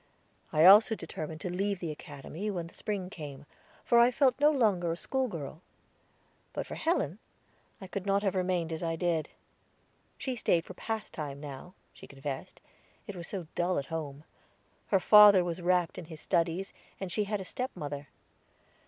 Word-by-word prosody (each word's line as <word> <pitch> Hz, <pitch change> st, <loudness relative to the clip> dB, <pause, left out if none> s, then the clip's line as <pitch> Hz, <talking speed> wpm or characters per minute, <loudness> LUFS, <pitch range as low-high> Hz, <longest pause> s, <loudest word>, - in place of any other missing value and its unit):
I 155 Hz, +2 st, +5 dB
also 210 Hz, +4 st, +8 dB
determined 160 Hz, -3 st, -6 dB
to 180 Hz, -, -3 dB
leave 200 Hz, 0 st, -1 dB
the 170 Hz, -3 st, -3 dB
Academy 150 Hz, +7 st, -6 dB
when 175 Hz, -5 st, -3 dB
the 165 Hz, -, -13 dB
spring 195 Hz, -3 st, -4 dB
came, 145 Hz, -6 st, -8 dB, 0.4 s
for 235 Hz, -, +5 dB
I 235 Hz, +1 st, +7 dB
felt 260 Hz, 0 st, +2 dB
no 295 Hz, +1 st, +6 dB
longer 205 Hz, -, +2 dB
a 165 Hz, -, -3 dB
schoolgirl. 175 Hz, -, -3 dB, 0.9 s
But -, -, -3 dB
for -, -, -8 dB
Helen, 215 Hz, -, 0 dB, 0.6 s
I 195 Hz, -, -8 dB
could 190 Hz, +1 st, -5 dB
not 200 Hz, +1 st, +2 dB
have 195 Hz, -, +1 dB
remained 180 Hz, -3 st, 0 dB
as 160 Hz, -, -4 dB
I 165 Hz, -1 st, -1 dB
did. 165 Hz, -2 st, 0 dB, 0.9 s
She 260 Hz, -2 st, -3 dB
stayed 170 Hz, -7 st, +1 dB
for -, -, -9 dB
pastime 160 Hz, -10 st, -5 dB
now, 145 Hz, +5 st, -9 dB, 0.2 s
she -, -, -13 dB
confessed, 135 Hz, -1 st, -7 dB, 0.4 s
it 205 Hz, -, -7 dB
was 170 Hz, -1 st, -7 dB
so 190 Hz, -4 st, -5 dB
dull 180 Hz, +1 st, 0 dB
at 140 Hz, -, -1 dB
home; 150 Hz, -2 st, -5 dB, 0.6 s
her 195 Hz, -, +3 dB
father 205 Hz, -1 st, +8 dB
was 175 Hz, 0 st, -4 dB
wrapped 180 Hz, -1 st, +1 dB
in 175 Hz, -, -8 dB
his 160 Hz, -1 st, -10 dB
studies, 170 Hz, +3 st, 0 dB, 0.3 s
and 190 Hz, -2 st, -5 dB
she 210 Hz, +3 st, 0 dB
had 210 Hz, 0 st, -2 dB
a 190 Hz, -, -6 dB
stepmother. 145 Hz, -, -5 dB
180 Hz, 170 wpm, -30 LUFS, 160-205 Hz, 0.9 s, also